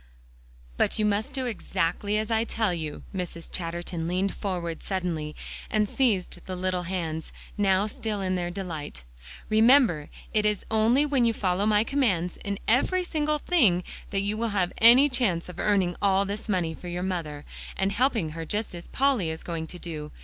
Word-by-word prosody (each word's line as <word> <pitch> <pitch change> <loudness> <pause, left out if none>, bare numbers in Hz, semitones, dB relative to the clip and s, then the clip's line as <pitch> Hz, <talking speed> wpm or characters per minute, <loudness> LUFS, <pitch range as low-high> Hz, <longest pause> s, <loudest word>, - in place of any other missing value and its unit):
"But - - +1
you 215 - +1
must 210 +6 0
do 260 -1 -1
exactly 205 -2 -1
as 215 +1 -2
I 225 0 +3
tell 220 -4 0
you." 155 -3 -5
Mrs. 175 -2 -5
Chatterton 170 -1 -4
leaned 185 +3 0
forward 175 -4 -3
suddenly, 170 -6 -3 0.3
and 210 -1 +2
seized 210 -7 0
the 185 - -3
little 185 0 -1
hands, 160 -4 -3 0.2
now 195 -1 +3
so 215 - -6
still 215 -2 -2
in 185 -1 -1
their 175 -1 -1
delight. 165 - -6 0.4
"Remember, 220 - +5 0.2
it 215 - +3
is 210 -2 0
only 225 +6 +4
when 275 -4 +2
you 230 -1 +3
follow 195 -1 0
my 210 0 +4
commands 210 -10 0
in 200 -1 -2
every 360 +10 +3
single 305 -3 0
thing 235 - +3 0.3
that 195 -1 0
you 205 +2 -1
will 230 +1 0
have 180 -2 +1
any 245 +5 +8
chance 240 -11 0
of 180 - -9
earning 190 -4 +2
all 195 0 +3
this 205 +3 -5
money 175 -5 0
for 180 - -10
your 175 +1 -3
mother, 160 -6 -3 0.3
and 195 +1 +1
helping 230 - +1
her 165 +1 -6
just 210 +6 -3
at 175 0 -6
Polly 260 -11 +2
is 160 0 -5
going 165 -2 -4
to 180 - -8
do. 155 -4 -6
195 Hz, 185 wpm, -27 LUFS, 175-220 Hz, 0.4 s, any